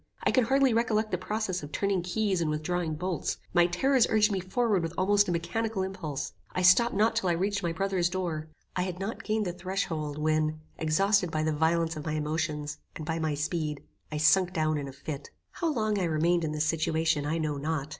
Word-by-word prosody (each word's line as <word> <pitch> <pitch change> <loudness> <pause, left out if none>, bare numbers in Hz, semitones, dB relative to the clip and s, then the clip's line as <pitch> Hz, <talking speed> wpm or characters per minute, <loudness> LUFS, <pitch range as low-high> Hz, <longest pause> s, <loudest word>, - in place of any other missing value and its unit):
I - - +3
can 255 -3 +3
hardly 270 0 +3
recollect 220 -1 +1
the 180 - +1
process 190 -1 -2
of 145 0 -8
turning 200 0 0
keys, 190 0 0
and 160 - 0
withdrawing 160 +1 -1
bolts. 180 +1 -2 0.2
My 175 0 +5
terrors 255 +8 +3
urged 215 -1 +4
me 195 - 0
forward 200 +1 +1
with 165 +1 -4
almost 205 +1 +3
a - - +1
mechanical 190 +5 -1
impulse. 165 -7 -4 0.2
I 185 - -1
stopped 235 +6 +6
not 220 +3 +3
till 185 - +1
I - - +3
reached 200 +4 0
my 170 -2 -1
brother's 185 0 0
door. 170 -4 -3 0.3
I 180 - +1
had 180 -1 -3
not 200 +4 -4
gained 215 -1 0
the 175 - -2
threshold, 175 -5 -3
when, 155 0 +1 0.2
exhausted 180 +4 +2
by 155 -1 -1
the 155 0 +1
violence 165 +2 +1
of 150 - -6
my 155 - -1
emotions, 150 -1 -2 0.2
and 155 - -6
by 160 +1 -2
my 155 -2 0
speed, 150 0 -2 0.3
I 150 - -2
sunk 180 +4 +4
down 155 -2 +1
in 140 - -5
a - - -6
fit. 140 +1 -7 0.2
How 335 -3 -1
long 215 -6 0
I 185 - +1
remained 170 +2 +2
in 155 - -1
this 155 0 0
situation 160 -1 +1
I 160 +2 0
know 155 -3 -1
not. 150 0 -2
175 Hz, 215 wpm, -29 LUFS, 155-195 Hz, 0.3 s, stopped